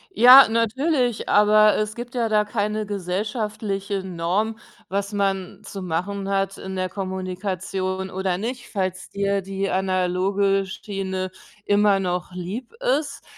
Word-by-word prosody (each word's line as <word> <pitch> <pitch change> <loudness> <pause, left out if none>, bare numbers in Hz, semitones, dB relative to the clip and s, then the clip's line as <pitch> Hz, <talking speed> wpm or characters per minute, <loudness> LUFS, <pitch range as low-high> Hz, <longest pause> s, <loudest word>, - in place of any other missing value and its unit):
Ja, 255 +2 +10
natürlich, 245 +2 0
aber 215 +1 +5
es 215 0 -1
gibt 240 +1 -8
ja 230 -2 +1
da 210 -1 +3
keine 210 0 -2
gesellschaftliche 200 0 -3
Norm, 190 +5 -1 0.3
was 200 +1 -2
man 195 -2 -1
zu 195 -2 -7
machen 195 +4 -3
hat 195 0 0
in 190 0 -6
der 185 0 -1
Kommunikation 185 0 -3
oder 185 -1 -2
nicht. 245 +3 -5
Falls 185 -2 -3
dir 200 0 0
die 195 0 -3
analoge 190 +1 +1
Schiene 190 -1 -4 0.3
immer 205 -1 +3
noch 180 -1 -2
lieb 195 - -6 0.3
ist, 290 -2 -8
195 Hz, 130 wpm, -23 LUFS, 185-215 Hz, 0.3 s, Ja